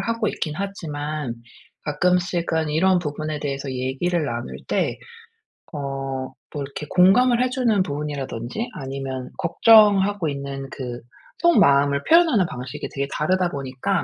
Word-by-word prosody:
하고 230 -2 -1
있긴 155 - -3
하지만 150 -8 -4 0.5
가끔씩은 170 0 0
이런 185 +4 +3
부분에 155 -2 -4
대해서 140 -1 -3
얘기를 135 +7 -1
나눌 115 - -4
때 - - 0 0.8
어 - - -4 0.7
뭐 145 - -3
이렇게 140 +2 -7
공감을 235 +7 +5
해 255 - +2
주는 240 -6 +2
부분이라든지 145 - -4
아니면 135 -2 -5
걱정하고 205 0 +5
있는 140 -1 -5
그 125 -3 -6 0.4
속마음을 140 - +4
표현하는 320 - +5
방식이 125 -3 -6
되게 140 0 -2
다르다 180 +3 +1
보니까 140 +6 -2
155 Hz, 305 characters per minute, -23 LUFS, 140-195 Hz, 0.8 s, 공감을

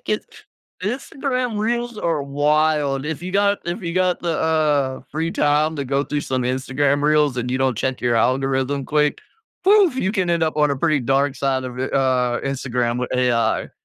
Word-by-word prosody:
it - - -41
gets 215 - -2 0.6
Instagram 250 +1 -2
reels 235 +1 -2
are 165 -7 -1
wild; 145 0 +1
if 155 0 -4
you 180 +1 -5
got 200 +1 +2
if 175 +5 -3
you 170 -1 -3
got 185 0 +1
the, 170 - -2
uh, 150 -4 +1
free 160 +3 -2
time 150 +1 +1
to 140 - -3
go 140 +2 0
through 145 0 -2
some 130 -2 -2
Instagram 135 +3 0
reels 150 -3 +3
and 125 0 -2
you 130 - 0
don't 130 -3 +1
check 130 +4 -2
your 120 -1 +1
algorithm 135 +3 0
quick, 150 +1 +1 0.4
poof, 390 -7 +5
you 205 -6 0
can 185 -5 0
end 170 -1 +1
up 155 -1 0
on 150 -1 +3
a 140 - -1
pretty 155 0 +1
dark 135 +2 +1
side 135 -1 -1
of 125 -1 -7
I - - -1
uh, 130 -2 +1
Instagram 125 -3 -2
with 125 - -3
AI. 125 -2 +1
145 Hz, 195 wpm, -21 LUFS, 130-170 Hz, 0.6 s, poof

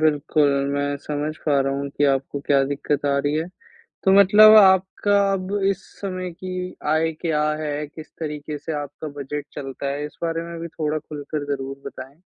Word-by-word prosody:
बिल्कुल 150 -1 +2 0.2
मैं 145 0 -1
समझ 150 +1 -3
पा 145 -2 +3
रहा 135 0 0
हूँ 140 +1 -3
कि 145 - 0
आपको 135 +1 -4
क्या 140 -1 +4
दिक्कत 145 +1 -2
आ 140 - +2
रही 145 +1 0
है, 160 +2 -1 0.6
तो 190 - +5
मतलब 210 +2 +8
आपका 190 +1 +5
अब 190 0 -3 0.2
इस 195 - -3 0.2
समय 185 -2 -4
की 185 +1 -5 0.2
आय 160 +1 +1
क्या 160 -3 0 0.2
है, 150 0 -3
किस 155 +2 -12
तरीके 150 -1 -4
से 160 +3 -5
आपका 145 +2 -7
बजट 145 +1 -4
चलता 135 0 -6
है? 145 +1 -3
इस 150 - -13
बारे 165 0 -1
में 170 - -6
भी 170 - -5
थोड़ा 155 -1 -2
खुलकर 150 0 -6
ज़रूर 135 0 -6
बताएँ। 135 +4 -9
150 Hz, 185 wpm, -23 LUFS, 145-170 Hz, 0.6 s, मतलब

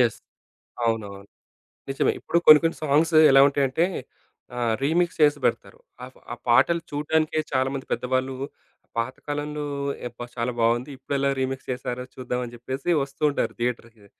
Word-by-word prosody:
Yes. 120 -3 +2 0.7
అవునవును. 100 -3 -3 0.6
నిజమే 135 - +1
ఇప్పుడు 170 - 0
కొన్ని 155 -1 +10
కొన్ని 165 - 0
సాంగ్స్ 155 +3 +2 0.2
ఎలా 135 0 +7
ఉంటాయంటే, 140 +4 +1 0.7
ఆహ్, 120 -2 0
రీమిక్స్ 170 +4 +1
చేసి 145 -1 +5
బెడతారు. - - -1 0.3
ఆప్ 130 - -15 0.2
ఆ! - - -5
పాటలు 130 +8 +4
చూడటానికే 155 +2 0
చాలామంది 135 0 -1
పెద్దవాళ్ళు 130 +1 -1 0.6
పాతకాలంలో 145 +4 -3 0.4
ఏబ్భా! 120 0 -8
చాలా 120 +1 -1
బావుంది 120 +3 +1
ఇప్పుడెలా 140 +1 -1
రీమిక్స్ 130 0 -3
చేసారో 125 0 -4
చూద్దాం 125 -1 -3
అని 120 -1 -8
జెప్పేసి 130 +6 -5
వస్తుంటారు. 140 +1 -1
థియేటర్‌కి. 115 -3 -4
130 Hz, 130 wpm, -24 LUFS, 120-145 Hz, 0.7 s, కొన్ని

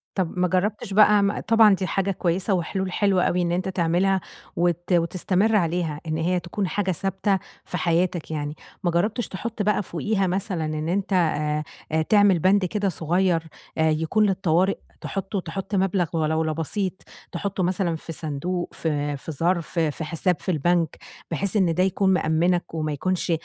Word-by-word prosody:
طَب 185 -2 -2
ما 180 - +3
جربتش 195 +2 -1
بَقى 210 -1 +4
طبعًا 225 -3 +6
دي 190 -1 -3
حاجة 195 0 0
كويسة 185 +2 0
وحلول 185 +2 -1
حلوة 195 -1 +2
أوي 180 - +1
إن 170 -1 0
أنت 180 +2 -1
تعملها، 185 +1 +1 0.3
وت 175 +1 0
وتستمر 185 +5 +2
عليها، 165 -4 0
إن 155 0 -1
هي 180 +2 +1
تكون 180 +3 -3
حاجة 195 0 -1
ثابتة 195 +2 0 0.3
في 180 - -4
حياتك 170 0 0
يعني، 150 0 -3 0.3
ما 175 - +2
جربتش 210 +8 0
تحط 220 +3 -5
بَقى 205 0 +1
فوقيها 195 +3 -1
مثلًا 185 -3 -1
إن 155 +1 -3
أنت 195 +2 -1
آآ، 155 -2 0
تعمل 205 -4 +5
بند 190 +2 +3
كده 200 +1 -1
صغير 170 +1 +1 0.3
آآ 160 0 +3
يكون 160 +8 +2
للطوارئ، 190 -1 +2 0.2
تحُطه 195 0 -3
تحُط 195 +4 -5
مبلغ 190 -2 +2
ولولا 160 0 +1
بسيط 175 +5 -2 0.4
تحطه 190 +2 -2
مثلًا 175 -2 0
في 165 - -8
صندوق 165 +4 -3
في 145 -2 -2
في 160 - -7
ظرف 170 +3 -1
في 160 -1 0
حساب 165 +3 0
في 185 - -2
البنك 170 +1 +1 0.3
بحيث 195 +6 -2
إن 180 -5 +3
ده 180 +2 +2
يكون 190 0 +2
مأمِّنك 175 0 +1
وما 155 -2 -2
يكونش 180 +4 -1
180 Hz, 165 wpm, -24 LUFS, 165-195 Hz, 0.4 s, طبعًا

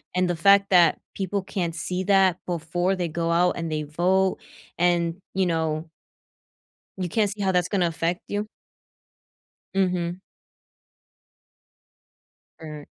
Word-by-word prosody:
And 180 -1 +2
the 175 - 0
fact 200 +3 +5
that 175 -3 +5 0.2
people 195 +1 -2
can't 175 -4 -3
see 180 +3 -3
that 190 -2 +4
before 175 +2 -1
they 175 -2 -2
go 165 +1 -2
out 175 +1 +3
and 165 -1 -3
they 155 0 -1
vote 185 +5 +1 0.4
and, 170 -1 +2 0.2
you 190 0 +1
know 160 -1 -1 1.1
you 180 -2 -3
can't 210 +1 +1
see 205 0 -7
how 190 -1 +2
that's 180 -1 +1
gonna 185 -4 +1
affect 170 +4 -2
you? 205 +1 -3 1.3
Mhm. 180 -2 0 2.4
Mm. 150 -2 -8
175 Hz, 130 wpm, -24 LUFS, 165-190 Hz, 2.4 s, fact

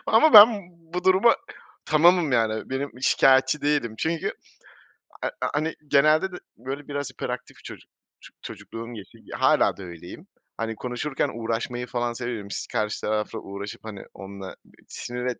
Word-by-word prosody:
ama 315 - +5
ben 210 +1 +12 0.5
bu 180 - -2
duruma 190 +5 +5 0.5
tamamım. 165 0 +4
Yani, 110 -1 0
benim, 135 +2 -2
şikâyetçi 130 +2 +4
değilim 145 -6 0
çünkü 160 0 -1 0.9
ha - - -2 0.2
hani, 155 +2 -1
genelde 155 +6 +4
de, - - -8 0.2
böyle, 135 +4 -6
biraz 145 -2 -4
hiperaktif - - -6
çocuk, - - -11 0.3
ço - - -15
çocukluğum 115 +1 -8
geçti, 100 -4 -11 0.2
hâlâ - - +3
da 100 - -9
öyleyim. 85 - -10 0.3
Hani, 115 0 -3
konuşurken 130 +5 -2
uğraşmayı 115 +2 -3
falan 120 -1 -2
severim. 115 -4 -5
Si - - -4
karşı 105 0 -2
tarafla 110 +1 -2
uğraşıp, 100 +2 -8
hani, 105 -3 -8
onunla 95 -1 -9 0.3
sinir 125 0 -6
125 Hz, 140 wpm, -25 LUFS, 110-150 Hz, 0.9 s, ben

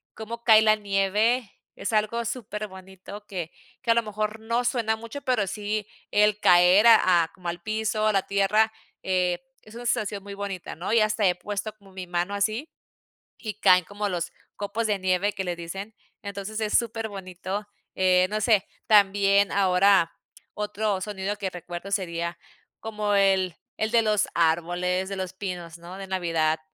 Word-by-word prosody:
cómo 230 +2 -7
cae 220 -2 +7
la 215 0 +5
nieve, 210 +3 +1 0.2
es 200 - -4
algo 215 +2 +1
super 215 -3 -4
bonito 190 +2 -11
que 175 -4 -5 0.3
que 235 -2 +1
a - - +4
lo 235 - +4
mejor, 215 +1 -3
no 230 +2 -1
suena 230 -3 +1
mucho, 230 +5 -8
pero 245 -6 +1
sí 210 +1 -3 0.3
el 210 0 +3
caer, 180 +5 +6
a 185 -7 +6
a 160 - -5
como 175 -2 -6
al 175 0 -5
piso, 215 0 0
a 215 - +3
la 195 - +2
tierra, 210 +3 +3 0.3
eh, 180 0 0 0.2
es 215 +1 -15
una 240 +1 -8
sensación 205 -4 -1
muy 200 - -8
bonita, 200 -3 -5
¿no? 180 +7 -3
Y 230 - +5
hasta 210 -1 +2
he 180 - +2
puesto 210 +3 -5
como 195 -2 -19
mi 185 -1 -7
mano 175 +3 -1
así, 215 +9 -1 0.7
y 215 -3 -5
caen 180 -2 +6
como 205 0 -3
los 175 -1 -3 0.3
copos 205 +3 -2
de 205 -2 0
nieve, 185 +2 +1
que 190 -1 -3
le 175 -1 -2
dicen. 195 +6 -7 0.3
Entonces, 200 +2 -5
es 215 -1 +3
super 225 -2 -2
bonito, 190 +1 -6 0.3
eh, 185 -1 +4
no 215 - -1
sé, 210 -3 +3 0.2
también, 200 -1 +4
ahora 190 -2 +4 0.5
otro 210 -2 -1
sonido 205 0 -3
que 190 - -3
recuerdo 175 +2 -7
sería 170 -3 -2 0.4
como 210 -2 -2
el 190 -3 +3 0.2
el 220 +1 -1
de 235 -1 +5
los 210 -2 +2
árboles, 175 +3 +1
de 195 - -4
los 185 -1 -4
pinos, 180 -3 -6
¿no? 175 +2 -10
De 195 -1 -7
navidad 165 -4 0
200 Hz, 175 wpm, -26 LUFS, 185-215 Hz, 0.7 s, cae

